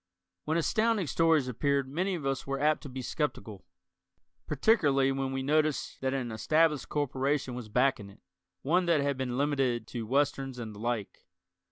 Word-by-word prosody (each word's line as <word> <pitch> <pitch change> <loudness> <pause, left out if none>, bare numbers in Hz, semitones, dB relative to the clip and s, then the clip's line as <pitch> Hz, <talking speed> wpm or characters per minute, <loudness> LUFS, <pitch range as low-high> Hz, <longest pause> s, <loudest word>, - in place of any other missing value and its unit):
When 160 +2 0
Astounding 215 +4 +1
Stories 160 -1 +2
appeared 140 +2 0
many 180 +7 -1
of 155 -5 -6
us 135 -1 -2
were 135 0 -2
apt 150 +1 +2
to 145 - -8
be 130 0 -6
skeptical, 110 -8 -4 0.8
particularly 140 - +3
when 135 0 -2
we 135 0 -2
noticed 155 +1 0
that 130 0 0
an 130 -3 -2
established 155 +7 +1
corporation 135 -1 -1
was 120 -3 -7
backing 125 -3 +1
it, 100 - -18 0.4
one 175 +5 +2
that 165 -4 +3
had 140 0 0
been 130 -2 -3
limited 135 -5 0
to 115 -3 -5
westerns 135 0 0
and 115 -3 -6
the 105 - -11
like. 115 -3 -4
135 Hz, 170 wpm, -30 LUFS, 125-150 Hz, 0.8 s, particularly